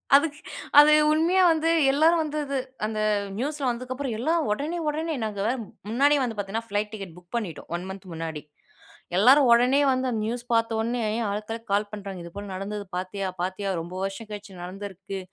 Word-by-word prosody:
அதுக்கு 290 0 +3 0.4
அது 295 +1 +8 0.2
உண்மையா 340 +4 +3
வந்து, 320 0 +1 0.2
எல்லாரும் 320 +4 +4
வந்து, 305 -1 -3
அது 275 -1 -2 0.3
அந்த 215 0 -3 0.4
நியூஸ்ல 280 +2 -2
வந்ததுக்கப்புறம், 255 +1 -3
எல்லா 270 +9 +1 0.2
ஒடனே, 295 +10 -2
ஒடனே 315 +2 -2
நாங்க 210 -2 -3 0.5
முன்னாடியே 285 +5 +4
வந்து 235 -3 -2
பாத்தீங்கன்னா 210 +3 -3
ஃபிளைட் 205 +1 -1
டிக்கெட் 195 -6 -7
புக் 175 -1 -18
பண்ணிட்டோம். 205 -9 -4
1 175 +1 -4
மன்த் 190 0 -8
முன்னாடி. 160 -2 -5 0.8
எல்லாரும் 260 +7 +7
ஒடனே 250 +4 +5
வந்து 255 0 0
நியூஸ் 235 +2 -3
பாத்தோனே 230 +1 +1 0.3
ஆளுக்கெல்லாம் 225 +3 -5
கால் 205 +1 +1
பண்றாங்க 195 -4 -7
இதுபோல 195 +4 -8
நடந்தது 200 +2 -5
பாத்தியா? 190 +2 -3
பாத்தியா? 190 +2 -2
ரொம்ப 170 +2 -8
வருஷம் 195 +3 -5
கழிச்சு 200 -3 -8
நடந்துருக்கு! 195 +1 -7
220 Hz, 155 wpm, -26 LUFS, 195-275 Hz, 0.8 s, அது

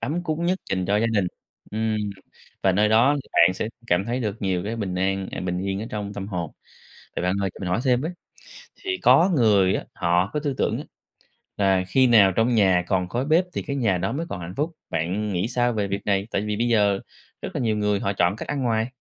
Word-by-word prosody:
ấm 170 +4 -2
cúng 160 0 -2
nhất 185 +1 +1
dành 95 -1 0
cho 100 +1 +2
gia 115 - +2
đình, 105 -5 +1 0.4
ừm, 110 0 -1 0.7
và 95 - +4
nơi 105 +3 +3
đó 115 +6 +5
thì - - -23
bạn 85 +2 +5
sẽ 110 - -3 0.2
cảm 90 -1 +2
thấy 120 +4 -2
được 105 -2 -4
nhiều 90 -2 0
cái 110 +3 -3
bình 100 -5 -3
an 95 +1 -1
à, - - -5
bình 90 0 -2
yên 95 +1 -2
ở - - -5
trong 105 -1 -4
tâm 100 -1 -5
hồn. 85 -6 -3 0.7
Vậy - - -1
bạn 90 +1 +1
ơi, 95 - 0
cho - - -12
mình 90 - -3
hỏi 90 +6 0
thêm 125 -1 +3
với, 160 +5 -2 0.7
thì 370 -1 -3
có 180 +3 +5
người 100 -6 +4
á, - - -4
họ 90 +1 +1
có 150 - 0
tư 145 -2 -2
tưởng - - 0
á - - -5 0.7
là 95 -2 +2
khi 130 +7 +4
nào 105 -5 +6
trong 115 +2 +2
nhà 95 -5 +4
còn 90 -2 0
khói 120 +5 -2
bếp 160 +5 +3
thì - - -3
cái 140 - -4
nhà 105 -9 +1
đó 95 - -1
mới 165 +5 -3
còn 90 - -5
hạnh 85 +1 -7
phúc, 155 +4 0 0.2
bạn 90 +6 -1
nghĩ 90 +5 -1
sao 120 0 +1
về 105 -2 -1
việc 100 +1 -4
này? 100 -1 +1
Tại 100 - -1
vì 105 -1 -2
bây 120 +2 0
giờ 105 -4 +3 0.4
rất 195 - -4
là - - -1
nhiều 110 -2 +1
người 105 -1 +1
họ 100 - 0
chọn 90 +1 +1
cách - - -7
ăn 145 -2 -2
ngoài. 115 -2 +1
105 Hz, 255 wpm, -24 LUFS, 95-120 Hz, 0.7 s, nào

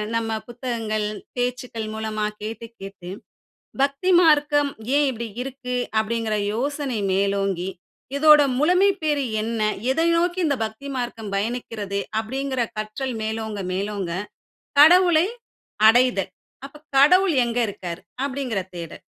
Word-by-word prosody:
நம்ம 225 -1 -1 0.2
புத்தகங்கள் 230 -3 -3 0.3
பேச்சுக்கள் 245 -3 -3
மூலமா 220 -1 -2 0.2
கேட்டு 225 +2 -6
கேட்டு, 195 -2 -9 0.7
"பக்தி 280 +7 +1
மார்க்கம் 295 -3 +4 0.3
ஏன் 290 -1 +4
இப்படி 235 -1 -5 0.2
இருக்கு?" 255 -1 -5 0.3
அப்டிங்குற 220 -1 -1 0.2
யோசனை 270 0 -2
மேலோங்கி, 195 -2 0 0.5
"இதோட 300 0 +7 0.2
முழுமை 360 +6 +4
பேரு 295 -3 +1 0.2
என்ன? 225 0 -3 0.3
எதை 325 +4 +1
நோக்கி 350 +2 +1
இந்த 280 -2 +1
பக்தி 220 +6 -7
மார்க்கம் 230 -4 -4
பயணிக்கிறது" 210 -2 -3 0.2
அப்டிங்குற 260 +2 -2 0.2
கற்றல் 225 +5 -4
மேலோங்க 220 -2 -3
மேலோங்க, 195 -2 -3 0.7
கடவுளை 345 +1 +7 0.6
அடைதல். 230 -5 +3 0.4
"அப்ப 300 +2 -15 0.2
கடவுள் 360 +4 +5
எங்க 235 +1 -2
இருக்காரு" 175 -3 -6 0.3
அப்டிங்குற 255 -8 -2
தேடல். 165 -2 -8
240 Hz, 115 wpm, -23 LUFS, 215-280 Hz, 0.7 s, இதோட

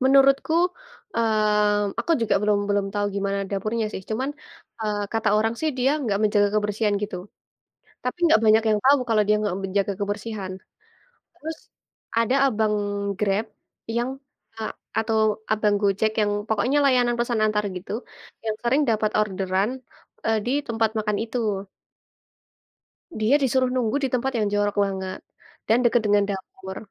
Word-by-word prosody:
menurutku, 275 +6 +4 0.5
mmm, 210 -2 +2
aku 335 - 0
juga 230 - +1
belum 210 -1 +3
belum 200 -1 +1
tahu 205 0 +1
gimana 200 0 -1
dapurnya 215 +3 -1
sih, - - -5
cuman, 260 +6 -1 0.5
eee, 210 -1 -1
kata 225 -1 +1
orang 225 +1 +1
sih 315 - +1
dia 255 +2 +3
nggak 205 -6 0
menjaga 205 -1 +3
kebersihan 210 0 +1
gitu, 205 -3 -3 0.9
tapi 250 +7 -2
nggak 225 -9 +5
banyak 220 +1 +6
yang 210 -1 +2
tahu 280 +1 +6
kalau 215 -2 +4
dia 210 - +5
nggak 200 -3 -1
menjaga 195 +1 0
kebersihan. 205 -1 -3 0.8
Terus 320 +1 -6 0.6
ada 230 +3 +3
abang 220 -3 +1 0.5
Grab 210 +1 +1 0.5
yang, 240 +2 0 0.5
eee, 220 - -3 0.3
atau 220 0 +1 0.3
abang 215 -1 +2
Gojek 205 +2 +2
yang 205 0 +1 0.2
pokoknya 225 +6 +1
layanan 245 -2 +3
pesan 240 -1 0
antar 210 -1 +1
gitu, 180 - -9 0.5
yang 215 -1 -1
sering 265 +5 +3
dapat 215 -1 +1
orderan, 195 0 0 0.6
eee, 220 0 +2
di 245 - 0 0.2
tempat 225 -2 +1
makan 210 -1 0
itu. 215 -4 -2 1.5
Dia 225 +6 +3
disuruh 260 -1 +2
nunggu 240 0 +1
di 270 - +1
tempat 265 +2 0
yang 210 - +1
jorok 205 0 +1
banget, 190 -1 -4 0.5
dan 225 - +5
dekat 240 0 +4
dengan 205 0 +4
dapur, 190 0 -7
215 Hz, 145 wpm, -24 LUFS, 205-235 Hz, 1.5 s, banyak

